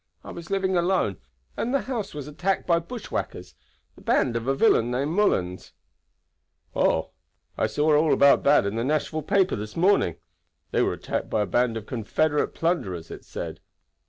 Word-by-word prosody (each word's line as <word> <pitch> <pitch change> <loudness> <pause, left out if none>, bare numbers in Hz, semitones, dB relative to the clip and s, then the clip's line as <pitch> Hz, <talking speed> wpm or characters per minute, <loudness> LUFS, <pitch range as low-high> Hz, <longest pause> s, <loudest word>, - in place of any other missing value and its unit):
I - - -8
was 170 -1 -9
living 190 -1 0
alone, 175 - +1 0.4
and 240 - -2
the 275 - +2
house 235 - -4
was 145 -2 -6
attacked 180 +6 -1
by 170 -1 +3
bushwhackers, 225 +7 -6 0.4
the - - -17
band 120 -3 +1
of 115 +1 -3
a 135 - +2
villain 135 - +3
named 135 +5 -1
Mullens." 95 - 0 1.0
"Oh! - - +1 0.4
I - - +1
saw 150 +7 +2
all 155 +1 +3
about 140 0 +5
that 145 -6 +5
in 100 +3 -2
the 115 - 0
Nashville 155 +3 -1
paper 190 +5 +2
this 105 +4 -7
morning. 180 - +3 0.6
They - - +2
were - - +1
attacked - - -4
by 110 - +1
a - - +1
band 120 0 +1
of 110 - -7
Confederate 145 +7 0
plunderers, 95 - -2
it - - -9
said." - - -6
150 Hz, 175 wpm, -25 LUFS, 115-180 Hz, 1.0 s, about